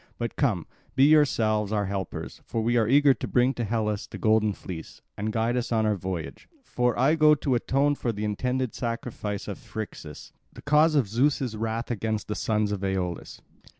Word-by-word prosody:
But 120 Hz, -1 st, -4 dB
come, 110 Hz, -, 0 dB, 0.3 s
be 135 Hz, -, +5 dB
yourselves 115 Hz, -9 st, +3 dB
our 105 Hz, -1 st, 0 dB
helpers, 95 Hz, -2 st, -5 dB
for 115 Hz, -, -3 dB
we 120 Hz, +2 st, +1 dB
are 115 Hz, -3 st, +3 dB
eager 140 Hz, +2 st, +5 dB
to -, -, -6 dB
bring 125 Hz, +2 st, +2 dB
to 120 Hz, -, -3 dB
Hellas 105 Hz, -1 st, -1 dB
the -, -, -8 dB
golden 110 Hz, -1 st, +3 dB
fleece, 90 Hz, -4 st, -9 dB
and 105 Hz, +2 st, -2 dB
guide 115 Hz, +2 st, 0 dB
us 125 Hz, -1 st, -2 dB
on 110 Hz, -1 st, +2 dB
our 105 Hz, -1 st, +2 dB
voyage, 90 Hz, -3 st, -6 dB
for 125 Hz, -, 0 dB
I 135 Hz, +5 st, +4 dB
go 155 Hz, -1 st, +5 dB
to 140 Hz, -2 st, -1 dB
atone 135 Hz, +4 st, +2 dB
for 125 Hz, -4 st, -2 dB
the 105 Hz, -1 st, -4 dB
intended 125 Hz, +4 st, -1 dB
sacrifice 115 Hz, -4 st, -4 dB
of -, -, -5 dB
Phrixus, 85 Hz, -8 st, -8 dB, 0.2 s
the -, -, -12 dB
cause 150 Hz, +2 st, +4 dB
of 135 Hz, -7 st, +3 dB
Zeus' 125 Hz, +2 st, +1 dB
wrath 115 Hz, +2 st, -3 dB
against 110 Hz, -1 st, -2 dB
the -, -, 0 dB
sons 105 Hz, -2 st, 0 dB
of 100 Hz, -1 st, -3 dB
Aeolus." 95 Hz, -3 st, -3 dB
115 Hz, 190 wpm, -26 LUFS, 105-130 Hz, 0.3 s, be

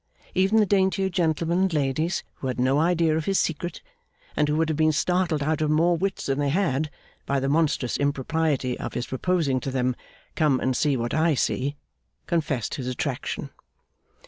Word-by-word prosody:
Even 190 Hz, +4 st, +3 dB
the 215 Hz, -, +5 dB
daintier 190 Hz, 0 st, +2 dB
gentlemen 170 Hz, -1 st, 0 dB
and 190 Hz, -2 st, +1 dB
ladies 150 Hz, +4 st, 0 dB
who 130 Hz, -, -4 dB
had 125 Hz, -1 st, -3 dB
no 130 Hz, +3 st, +3 dB
idea 165 Hz, -1 st, +2 dB
of 160 Hz, -1 st, -1 dB
his 195 Hz, -1 st, +1 dB
secret, 170 Hz, +2 st, -2 dB, 0.5 s
and 150 Hz, -, +2 dB
who 150 Hz, -, +1 dB
would 160 Hz, 0 st, +2 dB
have 155 Hz, -, -1 dB
been 155 Hz, +1 st, +3 dB
startled 170 Hz, 0 st, +1 dB
out 155 Hz, +1 st, 0 dB
of 155 Hz, -, +1 dB
more 165 Hz, +3 st, +3 dB
wits 190 Hz, +3 st, -2 dB
than 135 Hz, +1 st, 0 dB
they 145 Hz, -1 st, +1 dB
had, 155 Hz, -3 st, 0 dB, 0.4 s
by 140 Hz, 0 st, +1 dB
the 135 Hz, -, -1 dB
monstrous 145 Hz, -4 st, +1 dB
impropriety 140 Hz, -1 st, 0 dB
of -, -, -5 dB
his 120 Hz, -, -2 dB
proposing 140 Hz, -1 st, 0 dB
to 135 Hz, -, -4 dB
them 130 Hz, -1 st, 0 dB, 0.4 s
'Come 145 Hz, -5 st, +2 dB
and 130 Hz, -1 st, 0 dB
see 145 Hz, -1 st, +2 dB
what 120 Hz, 0 st, -2 dB
I 160 Hz, 0 st, +3 dB
see!' 140 Hz, +2 st, -1 dB, 0.5 s
confessed 150 Hz, -8 st, -1 dB
his 125 Hz, -, -4 dB
attraction. 125 Hz, -1 st, -3 dB
155 Hz, 185 wpm, -25 LUFS, 135-170 Hz, 0.5 s, the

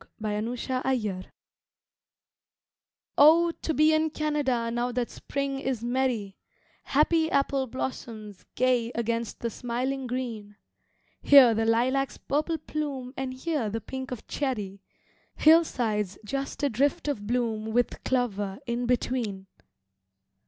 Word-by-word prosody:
From 215 Hz, -1 st, -2 dB
the 210 Hz, 0 st, -1 dB, 0.2 s
Trenches 245 Hz, -7 st, -2 dB, 1.9 s
OH, 330 Hz, +4 st, +7 dB
to 320 Hz, -, -1 dB
be 310 Hz, +1 st, +5 dB
in 315 Hz, 0 st, +2 dB
Canada 290 Hz, -7 st, -1 dB
now 240 Hz, +1 st, -1 dB
that 245 Hz, -1 st, -2 dB
Spring 275 Hz, -1 st, -3 dB
is 260 Hz, -4 st, -2 dB
merry, 240 Hz, -5 st, -1 dB, 0.5 s
Happy 320 Hz, +3 st, +3 dB
apple 275 Hz, -2 st, +1 dB
blossoms 225 Hz, -5 st, -6 dB
gay 250 Hz, -2 st, +2 dB
against 230 Hz, -1 st, -2 dB
the 235 Hz, -, -2 dB
smiling 255 Hz, +4 st, -3 dB
green; 230 Hz, -5 st, -4 dB, 0.7 s
Here 270 Hz, -5 st, +8 dB
the 225 Hz, 0 st, 0 dB
lilac's 260 Hz, +4 st, +1 dB
purple 310 Hz, +4 st, -1 dB
plume 285 Hz, -4 st, -4 dB
and 265 Hz, -1 st, -3 dB
here 260 Hz, -3 st, -2 dB
the 225 Hz, +2 st, -3 dB
pink 260 Hz, +4 st, -6 dB
of 250 Hz, -3 st, -7 dB
cherry, 210 Hz, -9 st, -3 dB, 0.5 s
Hillsides 235 Hz, -, +3 dB
just 275 Hz, +5 st, -4 dB
a 285 Hz, -, +3 dB
drift 285 Hz, +8 st, +1 dB
of 210 Hz, -8 st, -2 dB
bloom 225 Hz, -2 st, -1 dB
with 245 Hz, +2 st, 0 dB
clover 205 Hz, -6 st, -1 dB
in 240 Hz, 0 st, -2 dB
between! 235 Hz, -6 st, -1 dB
250 Hz, 125 wpm, -27 LUFS, 225-275 Hz, 1.9 s, Here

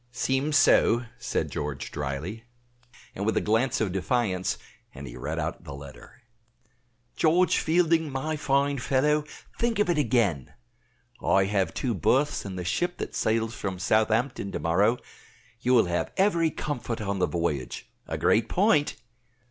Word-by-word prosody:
"Seems 135 Hz, +5 st, +1 dB
so," 120 Hz, -3 st, +4 dB
said -, -, -2 dB
George, 75 Hz, -2 st, -4 dB
dryly, 75 Hz, -, -4 dB, 0.7 s
and 100 Hz, -, -4 dB
with 110 Hz, +2 st, +1 dB
a -, -, +5 dB
glance 120 Hz, +4 st, +1 dB
of 105 Hz, -4 st, 0 dB
defiance; 95 Hz, -1 st, 0 dB, 0.4 s
and 70 Hz, -, -8 dB
he -, -, -9 dB
read -, -, -4 dB
out -, -, -3 dB
the 70 Hz, -, -8 dB
letter. 70 Hz, -, -13 dB, 0.9 s
"George 170 Hz, +2 st, +3 dB
Fielding, 160 Hz, -1 st, +2 dB
my 155 Hz, +4 st, -2 dB
fine 140 Hz, -1 st, +1 dB
fellow, 150 Hz, +4 st, +1 dB, 0.3 s
think 235 Hz, -1 st, +1 dB
of 205 Hz, -4 st, +2 dB
it 160 Hz, -, +1 dB
again. 110 Hz, -, +1 dB, 0.7 s
I 95 Hz, -, +4 dB
have 95 Hz, -4 st, 0 dB
two 125 Hz, -3 st, -1 dB
berths 130 Hz, -, +1 dB
in 95 Hz, -2 st, -5 dB
the 90 Hz, -1 st, -5 dB
ship 175 Hz, -, -1 dB
that -, -, -5 dB
sails 110 Hz, 0 st, 0 dB
from 95 Hz, -3 st, -4 dB
Southampton 110 Hz, +3 st, +1 dB
to -, -, -2 dB
morrow. 100 Hz, +8 st, +2 dB, 0.6 s
You 125 Hz, +2 st, +2 dB
will 115 Hz, -, +5 dB
have 85 Hz, 0 st, -2 dB
every 170 Hz, -5 st, +3 dB
comfort 125 Hz, -7 st, -4 dB
on 100 Hz, -2 st, -2 dB
the 90 Hz, -, +2 dB
voyage 75 Hz, -7 st, -3 dB, 0.2 s
a -, -, -3 dB
great 115 Hz, +1 st, +2 dB
point. 185 Hz, -, +2 dB
115 Hz, 155 wpm, -27 LUFS, 95-145 Hz, 0.9 s, a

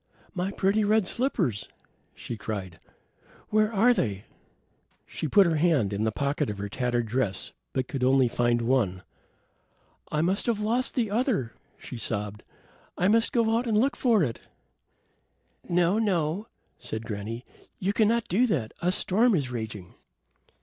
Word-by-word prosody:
"My 185 Hz, 0 st, -2 dB
pretty 200 Hz, +2 st, +1 dB
red 215 Hz, 0 st, +3 dB
slippers," 180 Hz, -, -1 dB, 0.5 s
she 120 Hz, -, -6 dB
cried. 100 Hz, -5 st, -5 dB, 0.7 s
"Where 215 Hz, 0 st, +2 dB
are 230 Hz, +4 st, +4 dB
they?" 100 Hz, -, -2 dB, 0.8 s
She -, -, -4 dB
put 200 Hz, +6 st, +6 dB
her 165 Hz, -2 st, +1 dB
hand 150 Hz, -, +2 dB
in 105 Hz, +2 st, -1 dB
the 110 Hz, -, +1 dB
pocket 140 Hz, +2 st, -1 dB
of 105 Hz, -, -4 dB
her 100 Hz, +1 st, -4 dB
tattered 120 Hz, +1 st, -1 dB
dress, 110 Hz, -3 st, -1 dB, 0.2 s
but 130 Hz, -1 st, -2 dB
could 135 Hz, -2 st, -3 dB
only 130 Hz, 0 st, +4 dB
find 120 Hz, 0 st, +1 dB
one. 115 Hz, -7 st, +1 dB, 1.1 s
"I 150 Hz, -, +1 dB
must 190 Hz, +7 st, 0 dB
have 230 Hz, -3 st, +1 dB
lost 235 Hz, +5 st, 0 dB
the 230 Hz, -6 st, 0 dB
other," 215 Hz, -, 0 dB, 0.2 s
she 125 Hz, -, -8 dB
sobbed. 105 Hz, -1 st, -3 dB, 0.6 s
"I 185 Hz, -, +2 dB
must 225 Hz, +1 st, +3 dB
go 225 Hz, -2 st, +2 dB
out 240 Hz, +2 st, 0 dB
and 220 Hz, -2 st, +2 dB
look 270 Hz, +6 st, +2 dB
for 225 Hz, -7 st, +3 dB
it." 120 Hz, -6 st, -2 dB, 1.3 s
"No, 175 Hz, +4 st, +3 dB
no," 190 Hz, -1 st, 0 dB, 0.3 s
said 110 Hz, +1 st, -6 dB
granny. 115 Hz, +2 st, -5 dB, 0.3 s
"You 195 Hz, +2 st, -1 dB
cannot 225 Hz, +2 st, +2 dB
do 230 Hz, +8 st, +3 dB
that. 130 Hz, -, -1 dB
A 180 Hz, -, +2 dB
storm 215 Hz, +4 st, +2 dB
is 135 Hz, -6 st, -1 dB
raging." 110 Hz, -6 st, -6 dB
155 Hz, 155 wpm, -27 LUFS, -, 1.3 s, put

